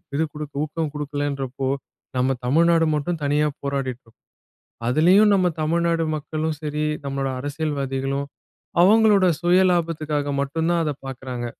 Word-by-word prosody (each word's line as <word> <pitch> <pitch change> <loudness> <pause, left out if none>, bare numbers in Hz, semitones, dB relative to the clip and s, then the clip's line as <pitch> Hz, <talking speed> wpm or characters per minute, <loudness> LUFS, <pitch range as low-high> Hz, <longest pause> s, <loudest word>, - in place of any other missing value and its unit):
இது 160 - +2
குடுக்க 150 -1 -7
ஊக்கம் 155 -1 -3
குடுக்கலன்றப்போ, 140 -3 -3 0.5
நம்ம 130 +1 +2
தமிழ்நாடு 165 +4 +4
மட்டும் 155 +3 -2
தனியா 150 +1 +2
போராடிட்டு 135 -2 -3
இருக்கும். 115 - -24 0.7
அதுலயும் 185 +10 +5
நம்ம 185 -2 +3
தமிழ்நாடு 170 +1 +1
மக்களும் 155 +1 -3
சரி, 150 0 -2 0.2
நம்மளோட 135 -1 -2
அரசியல்வாதிகளும் 140 -2 -2 0.6
அவங்களோட 210 -1 +5
சுய 175 +2 +4
லாபத்துக்காக 155 -4 -1
மட்டும் 160 +4 -1
தான் 170 -1 +2
அத 150 - 0
பாக்குறாங்க. 125 -2 -5
150 Hz, 125 wpm, -23 LUFS, 140-165 Hz, 0.7 s, அதுலயும்